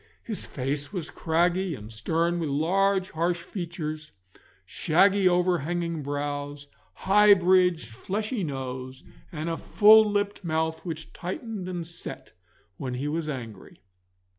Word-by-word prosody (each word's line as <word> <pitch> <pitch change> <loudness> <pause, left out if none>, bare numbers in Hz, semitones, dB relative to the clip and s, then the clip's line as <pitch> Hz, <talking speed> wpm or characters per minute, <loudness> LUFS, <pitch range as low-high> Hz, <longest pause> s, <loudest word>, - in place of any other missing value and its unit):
His 220 -3 -5
face 140 +2 -3
was 175 -6 -5
craggy 175 +2 +1
and 110 -1 -10
stern, 165 - 0
with 160 -3 -2
large 190 +6 +1
harsh 170 +1 -1
features, 160 -4 -5 0.5
shaggy 190 +3 +3
over 180 0 +2
hanging 170 +1 -2
brows, 145 0 -4 0.4
high 205 +1 +7
bridged 180 - +3
fleshy 205 - -3
nose, 130 -2 -5 0.3
and 155 -1 -4
a 165 -1 -1
full 215 0 +6
lipped 205 -1 -1
mouth 160 -1 -1
which 160 -3 -6
tightened 190 +1 -5
and 175 -2 -4
set 170 +1 -8 0.5
when 130 -2 -4
he 135 +4 -3
was 155 +1 -2
angry. 115 -8 -7
170 Hz, 130 wpm, -26 LUFS, 145-185 Hz, 0.5 s, high